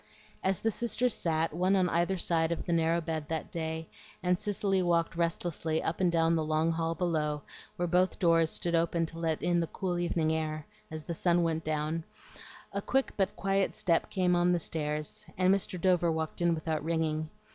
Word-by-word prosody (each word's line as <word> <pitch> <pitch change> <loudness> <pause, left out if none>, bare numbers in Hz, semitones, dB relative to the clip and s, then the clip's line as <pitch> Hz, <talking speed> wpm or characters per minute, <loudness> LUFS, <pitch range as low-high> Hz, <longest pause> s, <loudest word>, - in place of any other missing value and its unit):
As 190 0 +1
the 225 - +1
sisters 240 +2 +1
sat, 160 -1 0
one 185 +4 +2
on 185 -2 +3
either 175 +3 +1
side 170 -1 +1
the 175 - 0
narrow 165 +1 +2
bed 160 -2 -3
that 160 -1 -3
day, 160 -1 -3 0.4
and 180 0 +2
Cicely 200 -2 0
walked 170 -1 +1
restlessly 165 -1 -1
up 165 +3 -2
and 180 -2 +3
down 165 0 +3
the 160 - +1
long 155 +1 +1
hall 165 0 -1
below, 150 -5 -1 0.3
where 175 - -1
both 180 +2 +2
doors 165 -3 +3
stood 170 +1 -2
open 165 0 +2
to 165 +1 -8
let 160 -2 -1
in 175 0 +2
the 165 - 0
cool 180 -1 -2
evening 165 -2 +1
air, 155 -1 -2 0.2
as 155 -1 -6
the 170 - -4
sun 175 +1 +2
went 160 -1 0
down, 155 +1 -1 0.7
a 200 - -1
quick 270 +6 +1
but 195 -2 0
quiet 195 0 0
step 165 -2 +1
came 180 -2 +2
up 175 0 +3
the 175 - +3
steps, 150 -2 -3
and 185 +1 +4
Mr. 190 -2 -1
Dover 175 -2 +3
walked 160 +1 -3
in 170 -1 +3
without 155 -1 -2
ringing. 155 -1 -1
165 Hz, 195 wpm, -30 LUFS, 160-180 Hz, 0.7 s, and